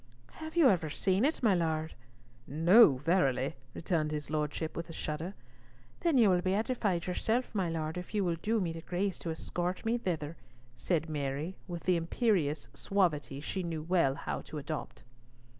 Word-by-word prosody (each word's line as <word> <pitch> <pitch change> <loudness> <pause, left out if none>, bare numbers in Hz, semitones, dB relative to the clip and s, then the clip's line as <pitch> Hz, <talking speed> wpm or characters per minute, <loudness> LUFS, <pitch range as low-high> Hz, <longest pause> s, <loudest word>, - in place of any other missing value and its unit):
"Have 315 +1 -8
you 325 -5 +7
ever 170 -8 +2
seen 190 +7 +1
it, 300 -2 0
my 215 -4 +5
Lord?" 160 -2 0 0.5
"No, 165 - +6
verily," 135 -3 +1 0.2
returned 160 -3 0
his 150 -1 -4
lordship 155 +1 -2
with 170 0 -5
a - - -7
shudder. 160 +5 -4 0.6
"Then 335 -5 +2
you 220 -5 +6
will 180 -1 +3
be 185 +1 +1
edified 210 -6 0
yourself, 225 +7 -1
my 190 -5 0
Lord, 160 +1 -3
if 180 - -9
you 205 - +2
will 175 -2 +1
do 225 +1 +1
me 170 -4 -1
the 165 - -7
grace 185 +3 -2
to 170 - -5
escort 175 +4 -3
me 235 +2 +1
thither," 165 -6 -3 0.4
said 165 +1 0
Mary, 150 +3 -3
with 175 -1 -6
the 180 -2 +3
imperious 165 - 0
suavity 160 -8 0
she 190 +5 -3
well 165 -3 +1
knew - - -9
how - - -3
to 155 - -8
adopt. 150 +1 -5
170 Hz, 175 wpm, -31 LUFS, 155-195 Hz, 0.6 s, you